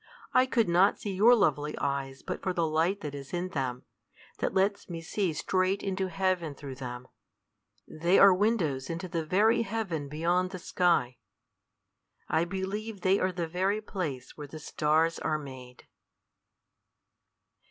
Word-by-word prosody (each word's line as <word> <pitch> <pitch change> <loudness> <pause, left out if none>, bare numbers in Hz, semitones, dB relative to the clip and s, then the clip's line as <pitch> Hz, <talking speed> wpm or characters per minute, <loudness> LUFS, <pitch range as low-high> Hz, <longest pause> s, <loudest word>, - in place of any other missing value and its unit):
I 255 0 +5
could 235 -4 +2
not 180 +4 +4
see 205 - -4
your 220 +6 +6
lovely 150 - +1
eyes 135 -1 -3
but - - -4
for 185 -1 -1
the 170 -2 +1
light 165 +6 +1
that 145 -2 -5
is 140 +1 -8
in 175 +1 -2
them; 130 -6 -3 0.6
that - - 0
lets 195 +1 0
me 170 -1 -5
see 180 +2 -1
straight 185 +5 0
into 190 -1 -1
heaven 185 -5 -1
through 135 -2 -8
them. 125 0 -6 0.8
They 170 +4 +2
are 195 -1 +8
windows 180 - 0
into 170 +2 -4
the 165 -2 -2
very 215 +8 +3
heaven 195 -10 -3
beyond 175 +5 +1
the 185 - -6
sky. 170 -8 +1 1.1
I 165 - +1
believe 195 +3 -4
they 190 +2 +3
are 185 - +1
the 175 -2 -3
very 190 +5 0
place 160 - -5
where 150 -1 -8
the 155 - -9
stars 155 +2 +1
are 155 - 0
made." 130 -4 -10
175 Hz, 155 wpm, -29 LUFS, 150-195 Hz, 1.1 s, are